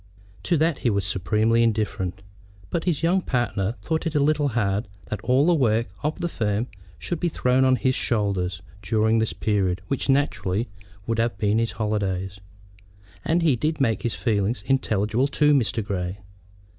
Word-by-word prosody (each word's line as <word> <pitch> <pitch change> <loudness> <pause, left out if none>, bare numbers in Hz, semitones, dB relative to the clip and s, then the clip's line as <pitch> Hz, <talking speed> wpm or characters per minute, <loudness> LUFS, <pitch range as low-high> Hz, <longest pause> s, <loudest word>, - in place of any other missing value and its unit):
To 170 - +4
that 160 0 +1
he 120 - +1
was 100 -3 0
supremely 105 +5 +1
indifferent; 100 -4 -1 0.5
but 165 - -1
his 170 -4 0
younger 180 +2 +2
partner 120 -4 -1
thought 160 +1 -1
it 160 - -3
a - - +4
little 145 0 +2
hard 105 -4 0 0.2
that 105 -2 -3
all 130 +6 +3
the 175 - +4
other 165 - +2
work 115 -1 +2
of 150 +2 -2
the 175 - 0
firm 110 -7 -1 0.3
should 175 - -3
be 175 - 0
thrown 130 -3 +2
on 130 0 +4
his 130 +1 +1
shoulders 95 -7 0 0.2
during 110 +4 +2
the 110 - 0
period 95 -4 0
which 135 0 -2
naturally 120 -6 +1 0.4
would 115 -1 -1
have 115 -3 0
been 105 +3 +1
his 115 0 -1
holidays, 100 -3 -2 0.8
and 170 +1 +1
he 155 -6 +4
did 155 +6 -1
make 115 -7 +1
his 120 - -2
feelings 105 -1 0
intelligible 110 -1 +1
to 150 +1 +3
Mr. 115 -5 +1
Grey. 95 -2 -3
115 Hz, 175 wpm, -24 LUFS, 100-140 Hz, 0.8 s, To